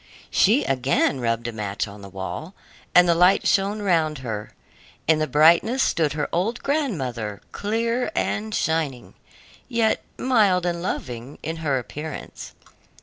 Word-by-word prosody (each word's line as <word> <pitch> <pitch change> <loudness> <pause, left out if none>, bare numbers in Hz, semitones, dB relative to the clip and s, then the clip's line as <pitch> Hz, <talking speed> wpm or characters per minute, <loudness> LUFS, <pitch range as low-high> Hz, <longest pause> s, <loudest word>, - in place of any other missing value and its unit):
She 235 +9 +4
again 135 +1 +1
rubbed 115 -1 -1
a - - -3
match 105 -2 -3
on 100 0 -11
the 100 - -10
wall, 95 - -6 0.4
and 180 0 +7
the 170 - +5
light 180 +3 +4
shone 200 +2 +1
round 160 -5 +2
her; 105 -2 -5 0.5
in 160 0 +4
the 155 - 0
brightness 170 - +4
stood 155 -3 +1
her 150 -1 -2
old 205 +8 -1
grandmother, 130 - -2
clear 230 +6 -1
and 215 +1 -1
shining, 155 -6 -1 0.6
yet 230 -3 +1 0.2
mild 205 -8 +3
and 170 -1 -1
loving 125 -6 -5
in 160 +2 -4
her 150 -4 0
appearance. 150 +5 -7
160 Hz, 145 wpm, -23 LUFS, 125-205 Hz, 0.6 s, and